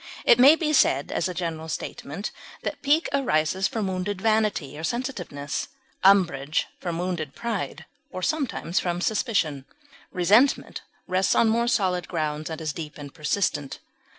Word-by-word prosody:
It 235 Hz, -, +6 dB
may 275 Hz, +5 st, +9 dB
be 315 Hz, -2 st, -1 dB
said, 145 Hz, -, +3 dB
as 170 Hz, -, 0 dB
a -, -, -4 dB
general 165 Hz, -2 st, -4 dB
statement, 160 Hz, +5 st, -5 dB, 0.3 s
that -, -, -4 dB
pique 295 Hz, +4 st, +3 dB
arises 190 Hz, -, +1 dB
from 225 Hz, -5 st, -2 dB
wounded 185 Hz, +1 st, -2 dB
vanity 215 Hz, -9 st, +1 dB
or 155 Hz, -, -7 dB
sensitiveness, 175 Hz, -, -3 dB, 0.4 s
umbrage 170 Hz, -7 st, +3 dB
from 170 Hz, -2 st, -3 dB
wounded 170 Hz, -5 st, -3 dB
pride 230 Hz, -4 st, -4 dB, 0.2 s
or 185 Hz, -8 st, -6 dB
sometimes 265 Hz, -, 0 dB
from 175 Hz, -1 st, -2 dB
suspicion. 180 Hz, -, 0 dB, 0.5 s
Resentment 210 Hz, +10 st, +3 dB, 0.2 s
rests 185 Hz, +1 st, +1 dB
on 225 Hz, -, +4 dB
more 235 Hz, +2 st, +2 dB
solid 185 Hz, -6 st, +1 dB
grounds, 155 Hz, -2 st, -2 dB
and 160 Hz, -, -5 dB
is 155 Hz, -2 st, -3 dB
deep 155 Hz, -3 st, -7 dB
and 145 Hz, -2 st, -9 dB
persistent. 150 Hz, -2 st, -1 dB
185 Hz, 150 wpm, -25 LUFS, 155-220 Hz, 0.5 s, may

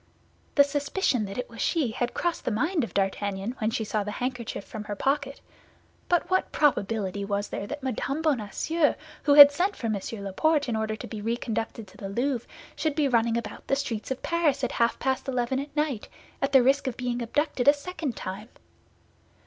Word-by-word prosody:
The 285 Hz, -, +8 dB
suspicion 285 Hz, -, 0 dB
that 195 Hz, 0 st, -7 dB
it 250 Hz, -, -3 dB
was 230 Hz, -, -8 dB
she 300 Hz, -9 st, +1 dB
had 240 Hz, +2 st, -2 dB
crossed 345 Hz, -1 st, -1 dB
the -, -, 0 dB
mind 305 Hz, -, +1 dB
of 230 Hz, -, -6 dB
D'Artagnan 195 Hz, +2 st, -1 dB
when 220 Hz, -2 st, +1 dB
she 225 Hz, -1 st, -2 dB
drew 210 Hz, 0 st, -1 dB
the 205 Hz, -, -5 dB
handkerchief 245 Hz, -5 st, -4 dB
from 215 Hz, -2 st, -7 dB
her 205 Hz, -, -4 dB
pocket; 275 Hz, +4 st, -1 dB, 0.7 s
but 350 Hz, -1 st, +2 dB
what 375 Hz, 0 st, +1 dB
probability 205 Hz, -8 st, +1 dB
was 200 Hz, 0 st, -2 dB
there 200 Hz, -, -4 dB
that 290 Hz, +2 st, -6 dB
Mme. 275 Hz, +3 st, -2 dB
Bonacieux, 295 Hz, +4 st, +1 dB, 0.3 s
who 285 Hz, -, +4 dB
had 285 Hz, -1 st, +12 dB
sent 365 Hz, +7 st, 0 dB
for -, -, -6 dB
M. 215 Hz, -3 st, 0 dB, 0.2 s
Laporte 290 Hz, +10 st, +1 dB
in 235 Hz, -, -1 dB
order 220 Hz, 0 st, -1 dB
to -, -, -8 dB
be 215 Hz, -2 st, -6 dB
reconducted 225 Hz, 0 st, -3 dB
to 190 Hz, -, -18 dB
the 195 Hz, -, -6 dB
Louvre, 240 Hz, +3 st, -1 dB, 0.3 s
should 310 Hz, -3 st, -1 dB
be 300 Hz, -2 st, +2 dB
running 235 Hz, -2 st, +2 dB
about 235 Hz, -3 st, -6 dB
the 275 Hz, -, +2 dB
streets 245 Hz, -6 st, -3 dB
of 265 Hz, 0 st, -4 dB
Paris 310 Hz, -5 st, +1 dB
at 255 Hz, -, 0 dB
half 235 Hz, 0 st, +1 dB
past 265 Hz, +1 st, -1 dB
eleven 255 Hz, 0 st, 0 dB
at 285 Hz, +1 st, -7 dB
night, 295 Hz, -7 st, -1 dB, 0.3 s
at 275 Hz, -, +1 dB
the 265 Hz, -3 st, +6 dB
risk 275 Hz, +2 st, +3 dB
of 250 Hz, -, -3 dB
being 245 Hz, -1 st, -2 dB
abducted 255 Hz, +2 st, -1 dB
a 285 Hz, -, +9 dB
second 295 Hz, -3 st, -5 dB
time? 200 Hz, +5 st, -6 dB
250 Hz, 200 wpm, -27 LUFS, 220-285 Hz, 0.7 s, had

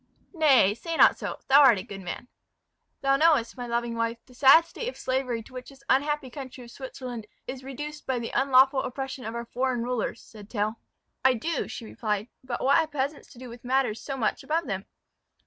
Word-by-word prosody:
"Nay, 275 Hz, -, +5 dB
say 325 Hz, +9 st, -5 dB
not -, -, +7 dB
so; -, -, -4 dB
thou 275 Hz, +2 st, +7 dB
art 260 Hz, -6 st, +7 dB
a 185 Hz, -, -4 dB
good 195 Hz, -1 st, -9 dB
man." 190 Hz, +6 st, -6 dB, 0.7 s
"Thou 275 Hz, 0 st, +3 dB
knowest, 305 Hz, -6 st, +3 dB
my 245 Hz, -2 st, -6 dB
loving 235 Hz, 0 st, -1 dB
wife, 230 Hz, 0 st, -1 dB
the 250 Hz, -, -18 dB
sad 275 Hz, +6 st, +7 dB
state 470 Hz, +7 st, -6 dB
of -, -, -10 dB
slavery 255 Hz, -3 st, -1 dB
to 255 Hz, -, -17 dB
which 255 Hz, 0 st, -8 dB
this 275 Hz, -1 st, -17 dB
unhappy 285 Hz, -1 st, +1 dB
country 260 Hz, -1 st, -8 dB
of 235 Hz, -, -13 dB
Switzerland 250 Hz, -4 st, -7 dB, 0.2 s
is 260 Hz, 0 st, -7 dB
reduced 295 Hz, +3 st, -7 dB
by 260 Hz, -1 st, 0 dB
the 235 Hz, -1 st, -4 dB
unlawful 265 Hz, 0 st, +5 dB
oppression 265 Hz, -1 st, -5 dB
of 225 Hz, +1 st, -5 dB
our 235 Hz, 0 st, -4 dB
foreign 250 Hz, 0 st, -1 dB
rulers," 245 Hz, -1 st, -2 dB
said 210 Hz, -2 st, -14 dB
Tell. 215 Hz, 0 st, -2 dB, 0.4 s
"I 260 Hz, -1 st, +5 dB
do," 320 Hz, +9 st, -2 dB
she 230 Hz, -, -7 dB
replied; 215 Hz, 0 st, -3 dB
"but 255 Hz, -2 st, -4 dB
what 275 Hz, -, +5 dB
have 320 Hz, -1 st, 0 dB
peasants 285 Hz, 0 st, -3 dB
to -, -, -18 dB
do 255 Hz, +1 st, -9 dB
with 235 Hz, 0 st, -11 dB
matters 250 Hz, -3 st, 0 dB
so 275 Hz, -2 st, -5 dB
much 220 Hz, -4 st, -1 dB
above 325 Hz, +2 st, 0 dB
them?" 195 Hz, 0 st, -4 dB
255 Hz, 210 wpm, -27 LUFS, 235-275 Hz, 0.7 s, not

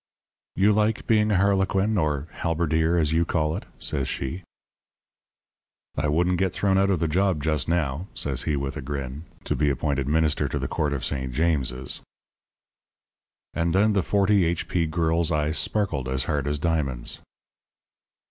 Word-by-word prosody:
"'You 100 Hz, +2 st, +4 dB
like 110 Hz, +1 st, +1 dB
being 110 Hz, -1 st, +3 dB
a 100 Hz, -, +3 dB
harlequin 100 Hz, +2 st, +2 dB
or 75 Hz, -5 st, 0 dB
halberdier, 80 Hz, +1 st, 0 dB
as 80 Hz, -2 st, +1 dB
you 85 Hz, +1 st, +3 dB
call 80 Hz, -2 st, 0 dB
it?' -, -, -6 dB
says 70 Hz, -4 st, -1 dB
she. 80 Hz, +8 st, -4 dB, 1.5 s
"'I -, -, 0 dB
wouldn't 90 Hz, +4 st, +1 dB
get 95 Hz, -2 st, +1 dB
thrown 95 Hz, -1 st, +2 dB
out 100 Hz, 0 st, +3 dB
of 95 Hz, -4 st, +1 dB
the 85 Hz, -, +1 dB
job 90 Hz, -1 st, +1 dB
just 75 Hz, -2 st, +1 dB
now,' 85 Hz, 0 st, -1 dB
says 70 Hz, -3 st, -1 dB
he, 75 Hz, -, +1 dB
with 70 Hz, -1 st, -3 dB
a 75 Hz, -, -5 dB
grin, 70 Hz, +2 st, -5 dB, 0.2 s
'to -, -, -1 dB
be 75 Hz, -1 st, +2 dB
appointed 70 Hz, 0 st, -1 dB
Minister 75 Hz, 0 st, +2 dB
to -, -, -2 dB
the -, -, -2 dB
Court 75 Hz, -3 st, -1 dB
of 70 Hz, -, -3 dB
St. 65 Hz, -2 st, -2 dB
James's.' 65 Hz, -4 st, -1 dB, 1.5 s
"And 85 Hz, +1 st, 0 dB
then 105 Hz, +2 st, +4 dB
the 100 Hz, -, +2 dB
40 100 Hz, +1 st, +3 dB
H.P. 85 Hz, 0 st, 0 dB
girl's 80 Hz, 0 st, +1 dB
eyes 75 Hz, +1 st, +1 dB
sparkled 80 Hz, -12 st, 0 dB
as 65 Hz, 0 st, 0 dB
hard 70 Hz, -1 st, -1 dB
as 75 Hz, 0 st, 0 dB
diamonds. 70 Hz, -6 st, -1 dB
80 Hz, 165 wpm, -25 LUFS, 70-95 Hz, 1.5 s, You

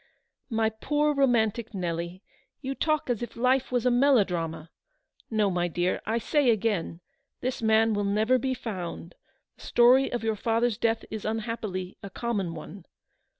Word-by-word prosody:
" -, -, -61 dB
My 225 Hz, -2 st, +1 dB
poor 295 Hz, +7 st, 0 dB
romantic 235 Hz, -5 st, +1 dB
Nelly, 175 Hz, +1 st, -4 dB, 0.4 s
you 270 Hz, -1 st, -3 dB
talk 310 Hz, +2 st, 0 dB
as 245 Hz, -3 st, -1 dB
if 240 Hz, -, -6 dB
life 255 Hz, +2 st, +1 dB
was 245 Hz, -1 st, 0 dB
a 250 Hz, -, +4 dB
melodrama. 180 Hz, -, +2 dB, 0.6 s
No, 215 Hz, -3 st, +1 dB
my 175 Hz, -1 st, 0 dB
dear, 175 Hz, +2 st, -1 dB
I 225 Hz, +2 st, +1 dB
say 280 Hz, +3 st, +2 dB
again, 205 Hz, -6 st, 0 dB, 0.4 s
this 255 Hz, -1 st, -2 dB
man 220 Hz, 0 st, +3 dB
will 205 Hz, 0 st, 0 dB
never 215 Hz, +6 st, +2 dB
be 260 Hz, +1 st, -1 dB
found; 180 Hz, -7 st, -6 dB, 0.4 s
the -, -, -18 dB
story 250 Hz, +3 st, +4 dB
of 240 Hz, -2 st, -3 dB
your 220 Hz, -1 st, 0 dB
father's 230 Hz, +1 st, 0 dB
death 225 Hz, 0 st, 0 dB
is 220 Hz, -1 st, -5 dB
unhappily 215 Hz, -4 st, -4 dB
a 200 Hz, -, -7 dB
common 200 Hz, -7 st, -2 dB
one. 170 Hz, +4 st, -10 dB
225 Hz, 160 wpm, -27 LUFS, 190-245 Hz, 0.6 s, a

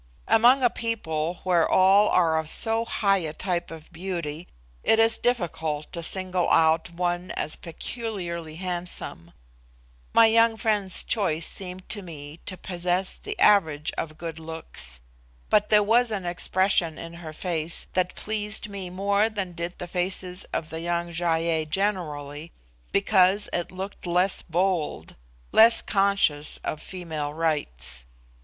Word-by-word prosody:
Among 240 Hz, +4 st, +5 dB
a 245 Hz, -, +4 dB
people 175 Hz, -8 st, -3 dB
where 175 Hz, -3 st, +2 dB
all 195 Hz, +3 st, +5 dB
are 165 Hz, -3 st, +3 dB
of 155 Hz, -1 st, -3 dB
so 225 Hz, +4 st, +3 dB
high 200 Hz, -4 st, +2 dB
a 155 Hz, -3 st, -4 dB
type 175 Hz, +1 st, -2 dB
of 165 Hz, +1 st, -11 dB
beauty, 170 Hz, -3 st, -5 dB, 0.4 s
it 225 Hz, -, +4 dB
is 225 Hz, 0 st, +3 dB
difficult 160 Hz, -10 st, -1 dB
to 170 Hz, -, -4 dB
single 185 Hz, +1 st, -1 dB
out 160 Hz, +1 st, +3 dB
one 175 Hz, +1 st, -2 dB
as 150 Hz, -, -2 dB
peculiarly 170 Hz, -4 st, -5 dB
handsome. 175 Hz, -, -4 dB, 0.8 s
My 230 Hz, -, +7 dB
young 225 Hz, 0 st, +4 dB
friend's 210 Hz, -4 st, +1 dB
choice 170 Hz, -7 st, 0 dB
seemed 185 Hz, -1 st, -7 dB
to 205 Hz, -, -2 dB
me 155 Hz, -3 st, -10 dB
to 185 Hz, -, -5 dB
possess 180 Hz, +1 st, -1 dB
the 420 Hz, 0 st, -6 dB
average 160 Hz, -7 st, +3 dB
of 155 Hz, -1 st, -5 dB
good 165 Hz, -1 st, -6 dB
looks; 160 Hz, -, -4 dB, 0.5 s
but 210 Hz, 0 st, +3 dB
there 210 Hz, -1 st, +5 dB
was 235 Hz, +3 st, +3 dB
an 200 Hz, -4 st, -3 dB
expression 175 Hz, -1 st, +1 dB
in 165 Hz, 0 st, -8 dB
her 160 Hz, -2 st, -7 dB
face 165 Hz, 0 st, -3 dB
that 185 Hz, -1 st, 0 dB
pleased 210 Hz, 0 st, -1 dB
me 195 Hz, -3 st, -5 dB
more 200 Hz, +4 st, +1 dB
than 200 Hz, -4 st, -4 dB
did 170 Hz, +1 st, -5 dB
the 180 Hz, -, -6 dB
faces 180 Hz, +1 st, -2 dB
of 155 Hz, -, -4 dB
the 160 Hz, 0 st, -5 dB
young 170 Hz, 0 st, -2 dB
Gy 170 Hz, +1 st, -2 dB, 0.2 s
ei 160 Hz, -1 st, +1 dB
generally, 155 Hz, -4 st, -2 dB, 0.4 s
because 200 Hz, 0 st, +3 dB
it 175 Hz, -, -2 dB
looked 190 Hz, 0 st, -7 dB
less 180 Hz, +2 st, +3 dB
bold 170 Hz, -, -1 dB, 0.4 s
less 225 Hz, +1 st, +8 dB
conscious 195 Hz, -7 st, +2 dB
of 155 Hz, -, -4 dB
female 160 Hz, -5 st, -5 dB
rights. 65 Hz, -, -2 dB
180 Hz, 145 wpm, -25 LUFS, 160-200 Hz, 0.8 s, less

